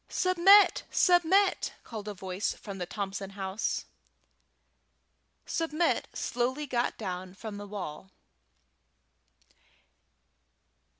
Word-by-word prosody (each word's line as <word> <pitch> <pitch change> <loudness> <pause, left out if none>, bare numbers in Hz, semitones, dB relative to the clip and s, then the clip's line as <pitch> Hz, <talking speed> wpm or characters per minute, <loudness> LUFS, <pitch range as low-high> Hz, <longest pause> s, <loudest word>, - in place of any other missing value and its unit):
"Submit! 370 +3 +5
Submit!" 365 +2 +3
called 215 -3 -8
a 210 - -5
voice 190 +1 -2
from 200 -2 -9
the 180 - -3
Thompson 195 -1 -4
house. 190 +2 -2 1.6
Submit 330 0 0
slowly 255 +5 -1
got 245 -3 -1
down 185 -2 -5
from 210 0 -7
the 205 0 -8
wall. 190 -3 -7
215 Hz, 85 wpm, -29 LUFS, -, 1.6 s, Submit